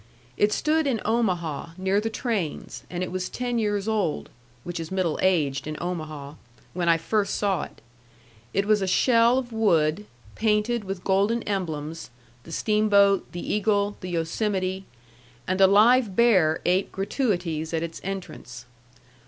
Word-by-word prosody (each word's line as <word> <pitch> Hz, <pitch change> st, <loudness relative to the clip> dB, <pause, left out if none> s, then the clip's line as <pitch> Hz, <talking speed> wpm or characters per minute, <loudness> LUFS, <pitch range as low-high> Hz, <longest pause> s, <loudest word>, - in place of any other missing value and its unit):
It 205 Hz, +7 st, +2 dB
stood 310 Hz, +5 st, +1 dB
in 245 Hz, -5 st, 0 dB
Omaha, 175 Hz, -9 st, -1 dB
near 190 Hz, +2 st, +1 dB
the 225 Hz, -, -2 dB
trains, 220 Hz, -, -3 dB
and 180 Hz, 0 st, -3 dB
it 180 Hz, -, -4 dB
was 185 Hz, 0 st, -3 dB
ten 245 Hz, -1 st, -2 dB
years 205 Hz, -2 st, -1 dB
old 205 Hz, -8 st, -1 dB, 0.3 s
(which 175 Hz, -1 st, -5 dB
is 165 Hz, -1 st, -5 dB
middle 185 Hz, -4 st, -1 dB
aged 150 Hz, -7 st, +1 dB
in 155 Hz, 0 st, -4 dB
Omaha) 155 Hz, -5 st, -5 dB, 0.4 s
when 175 Hz, -1 st, 0 dB
I 165 Hz, -, +5 dB
first 200 Hz, +5 st, -1 dB
saw 195 Hz, -5 st, 0 dB
it. -, -, -16 dB, 0.7 s
It 195 Hz, -, 0 dB
was 210 Hz, -1 st, +3 dB
a 190 Hz, -, -1 dB
shell 235 Hz, +4 st, +4 dB
of 250 Hz, -3 st, -3 dB
wood, 190 Hz, -3 st, +2 dB, 0.3 s
painted 215 Hz, +1 st, 0 dB
with 190 Hz, -1 st, -5 dB
golden 200 Hz, +4 st, +1 dB
emblems, 165 Hz, -6 st, -4 dB, 0.4 s
the 165 Hz, -, -11 dB
steamboat, 200 Hz, 0 st, +3 dB
the 175 Hz, -, -4 dB
eagle, 205 Hz, -1 st, +1 dB
the 185 Hz, -, -6 dB
Yosemite, 185 Hz, +3 st, -2 dB, 0.6 s
and 185 Hz, +1 st, 0 dB
a 190 Hz, -, +8 dB
live 215 Hz, +1 st, +4 dB
bear 185 Hz, -10 st, +4 dB
ate 185 Hz, +2 st, +1 dB
gratuities 180 Hz, -, -2 dB
at 165 Hz, -1 st, -1 dB
its 165 Hz, -1 st, -6 dB
entrance. 180 Hz, -11 st, -7 dB
195 Hz, 155 wpm, -25 LUFS, 170-215 Hz, 0.7 s, a